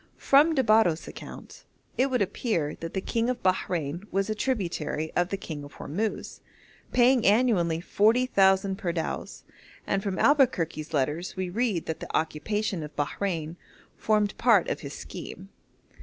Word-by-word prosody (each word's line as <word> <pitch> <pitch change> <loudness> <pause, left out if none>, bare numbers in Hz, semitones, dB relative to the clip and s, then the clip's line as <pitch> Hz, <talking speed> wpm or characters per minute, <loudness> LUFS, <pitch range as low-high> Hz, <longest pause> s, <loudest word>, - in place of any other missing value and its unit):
From 300 +4 +4
de 265 - +3
Barros' 215 -7 +3
account - - -10 0.3
it 260 - +2
would 250 -5 +2
appear 175 - -2
that 165 +2 -6
the 190 - 0
king 230 +4 -1
of 250 -1 -3
Bahrein 175 -3 -1
was 195 +2 0
a - - +1
tributary 175 - -2
of 175 0 +1
the 195 - -2
king 155 -6 -7
of 145 - -11
Hormuz, 210 +8 -4 0.5
paying 250 -1 +4
annually 200 -7 +3
40,000 195 -3 +3
pardaos, 170 - -4 0.4
and 195 - 0
from 195 -1 -3
Albuquerque's 180 - +2
letters 150 +6 -1
we 185 -1 -3
read 215 -5 0
that 160 - -4
the - - -2
occupation 190 +4 -2
of 150 -1 -8
Bahrein 165 +1 -3 0.4
formed 210 -2 +1
part 230 -7 +4
of - - -2
his 140 -1 -8
scheme. 195 +2 -9
190 Hz, 150 wpm, -27 LUFS, 165-225 Hz, 0.5 s, From